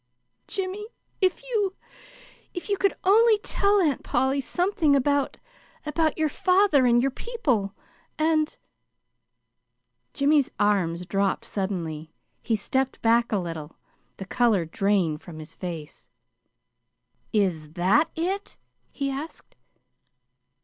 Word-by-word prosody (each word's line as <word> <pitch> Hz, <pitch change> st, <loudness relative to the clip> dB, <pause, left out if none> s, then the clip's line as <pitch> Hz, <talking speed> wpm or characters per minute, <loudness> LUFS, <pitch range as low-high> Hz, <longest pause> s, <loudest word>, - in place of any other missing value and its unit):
"Jimmy, 390 Hz, +2 st, -3 dB, 0.3 s
if 375 Hz, +4 st, +1 dB
you 420 Hz, -6 st, -1 dB, 0.8 s
if 355 Hz, -, -6 dB
you 400 Hz, -, +1 dB
could 395 Hz, 0 st, +1 dB
only 440 Hz, +3 st, +5 dB
tell 410 Hz, -1 st, +2 dB
Aunt 305 Hz, -8 st, +1 dB
Polly 265 Hz, +2 st, +1 dB
something 350 Hz, -2 st, +1 dB
about 280 Hz, 0 st, +1 dB, 0.5 s
about 310 Hz, 0 st, 0 dB
your 315 Hz, -1 st, +2 dB
father, 365 Hz, -5 st, +3 dB
and 240 Hz, 0 st, +4 dB
your 270 Hz, -, +1 dB
people, 255 Hz, -, -2 dB, 0.4 s
and 310 Hz, 0 st, +1 dB, 0.7 s
" -, -, -52 dB
Jimmy's 285 Hz, -1 st, +3 dB
arms 180 Hz, -4 st, +1 dB
dropped 195 Hz, +2 st, 0 dB
suddenly. 165 Hz, -6 st, -4 dB, 0.3 s
He 225 Hz, -, 0 dB
stepped 265 Hz, +5 st, -1 dB
back 235 Hz, +1 st, +3 dB
a 210 Hz, -, +2 dB
little. 165 Hz, -4 st, -6 dB, 0.4 s
The 195 Hz, -, -6 dB
color 210 Hz, -4 st, +2 dB
drained 175 Hz, -3 st, 0 dB
from 170 Hz, -3 st, -11 dB
his 155 Hz, +1 st, -9 dB
face. 165 Hz, -5 st, -8 dB, 1.2 s
"Is 170 Hz, -8 st, 0 dB
that 200 Hz, -, +3 dB
it?" 380 Hz, +5 st, -3 dB, 0.3 s
he 275 Hz, -1 st, -3 dB
asked. 295 Hz, +4 st, -7 dB
265 Hz, 115 wpm, -25 LUFS, -, 1.2 s, only